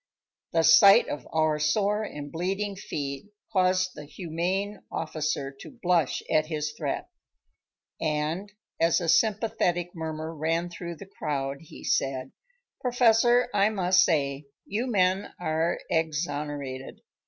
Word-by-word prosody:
The 165 -1 +2
sight 165 +5 +8
of 145 -4 -5
our 155 -1 +2
sore 200 +8 +1
and 145 -9 -6
bleeding 195 +4 -2
feet 140 -5 -5 0.3
caused 185 -1 +2
the 150 - -9
"humane" 180 +6 -3
officer 155 -3 -2
to 260 - -11
blush 175 -5 +1
at 155 -1 +2
his 155 -1 -2
threat, - - -3 0.9
and 155 +6 -1 0.3
as 165 +3 +4
a 170 - -3
sympathetic 180 -3 +1
murmur 160 -1 -5
ran 165 +3 -1
through 170 0 -6
the 200 - -11
crowd 140 -7 -3
he 165 - -13
said: 135 -1 0 0.5
"Professor, 240 0 +4
I 205 +1 +4
must 185 -3 +4
say, 140 -4 0 0.2
you 225 +6 -2
men 190 -3 +1
are 160 0 0
exonerated. 145 -4 -3
165 Hz, 125 wpm, -27 LUFS, 150-195 Hz, 0.9 s, sight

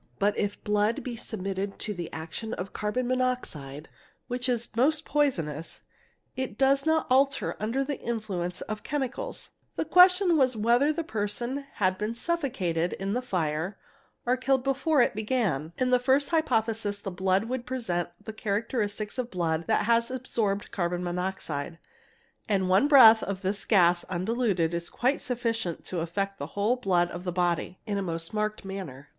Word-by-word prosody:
But 205 +1 +2
if 205 0 -2
blood 210 +2 +1
be 245 -2 -4
submitted 195 -3 -4
to 210 - -2
the 175 -3 -6
action 165 +8 -5
of 185 +2 -6
carbon 210 +4 -1
monoxide, 245 - -2 0.4
which 245 +1 -2
is 235 -1 0
most 300 +6 +2
poisonous, 165 - 0 0.5
it 260 -5 -4
does 275 +2 +3
not 320 0 +3
alter 275 +2 +2
under 230 +6 0
the 285 0 -4
influence 195 -7 -3
of 215 -1 -5
chemicals; 290 - -4 0.2
the - - -1
question 360 +1 +6
was 260 -4 +3
whether 240 +7 +3
the 330 +2 -2
person 240 +4 -3
had 185 -2 0
been 215 +2 -2
suffocated 230 - -1
in 195 +1 -3
the 250 - 0
fire 180 -4 -2 0.5
or 245 +1 +3
killed 265 0 +1
before 275 +1 +3
it - - 0
began. 210 - -1
In 255 0 +1
the 250 - +5
first 265 +3 +2
hypothesis 225 -10 +1
the 200 -1 -6
blood 190 +2 +1
would 245 +1 -4
present 185 -10 -2 0.2
the 220 - -6
characteristics 215 +1 -2
of 245 -1 -2
blood 165 -4 -1
that - - +2
has 235 +1 +3
absorbed 225 -6 -2
carbon 175 -1 -1
monoxide, 175 -4 -3 0.7
and 190 -3 +2
one 190 +10 +4
breath 230 -6 +9
of 195 -1 -4
this 195 +2 0
gas 175 -4 +4
undiluted 185 -2 0
is 170 0 -3
quite 260 +4 0
sufficient 230 -8 -2
to 180 - -3
affect 195 +4 -2
the 140 - -4
whole 210 +5 +3
blood 180 -7 +1
of 175 - -6
the 180 - -2
body 175 0 0
in 205 -3 -1
a - - -1
most 165 -1 -2
marked 215 -1 -2
manner. 180 -9 -7
215 Hz, 165 wpm, -28 LUFS, 180-255 Hz, 0.7 s, breath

